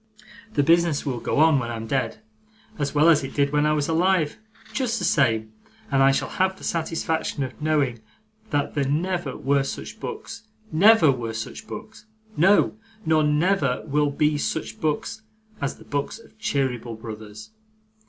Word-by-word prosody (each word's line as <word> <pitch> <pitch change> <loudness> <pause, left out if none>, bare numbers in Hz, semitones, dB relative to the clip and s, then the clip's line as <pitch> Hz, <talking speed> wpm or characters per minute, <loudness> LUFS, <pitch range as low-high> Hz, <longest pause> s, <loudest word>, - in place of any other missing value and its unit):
The 145 - +2
business 165 -1 +3
will 130 -4 -2
go - - -2
on, 155 -2 +5
when 120 -2 -4
I'm 115 -1 -5
dead, 135 - -2 0.6
as 145 0 -2
well 150 +2 +5
as 155 -4 +5
it 135 - -7
did 140 -1 +2
when 150 0 +2
I 150 - +3
was 150 -2 0
alive 170 -1 +1 0.3
just 245 -3 0
the - - -2
same 110 -6 +2 0.4
and 135 -1 +3
I 135 0 +6
shall 135 - 0
have 190 0 0
the - - -14
satisfaction 160 -3 -1
of 130 +2 -7
knowing 145 -6 +1 0.5
that 145 -1 -1
there 140 -2 0
never 170 -2 -1
were 140 0 +2
such 135 - -6
books 425 - -7 0.2
never 175 -1 +6
were 115 -3 -4
such 110 - -6
books! 220 0 -9 0.3
No, 195 +6 +4 0.3
nor 155 -1 +3
never 150 -2 +1
will 150 0 +1
be 150 +1 +1
such 110 -5 -3
books 155 +8 -2 0.4
as 140 - -2
the - - -16
books 145 +7 -3
of 230 - -18
Cheeryble 125 - -1
Brothers. 110 - -9
150 Hz, 170 wpm, -24 LUFS, 135-165 Hz, 0.6 s, I